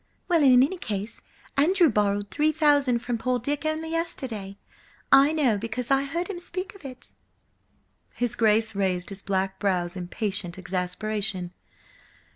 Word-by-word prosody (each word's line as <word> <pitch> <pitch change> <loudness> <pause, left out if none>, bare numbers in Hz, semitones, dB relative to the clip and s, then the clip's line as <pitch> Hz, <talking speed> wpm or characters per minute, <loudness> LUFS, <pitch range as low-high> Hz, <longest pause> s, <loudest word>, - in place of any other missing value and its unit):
"Well, 340 -3 +3
in 255 -3 +7
any 360 +7 -1
case, 210 - -4 0.3
Andrew 340 +5 +4
borrowed 205 -4 0
three 300 +9 +2
thousand 285 -6 +2
from 240 -2 -2
poor 255 +1 0
Dick 285 +5 -2
only 315 +1 -2
yesterday. 250 - -4 0.5
I 275 +2 +7
know, 265 -10 +2
because 230 +4 -4
I 275 0 +3
heard 335 +5 -3
him 395 -4 -5
speak 365 +2 -6
of 395 -5 -16
it." 255 -2 -9 1.0
His 245 -2 -1
Grace 220 0 +2
raised 185 -3 -1
his 195 -1 -8
black 190 -1 -2
brows 180 -3 0
in 180 -1 -5
patient 190 -3 -3
exasperation. 185 0 -1
235 Hz, 150 wpm, -26 LUFS, 195-295 Hz, 1.0 s, in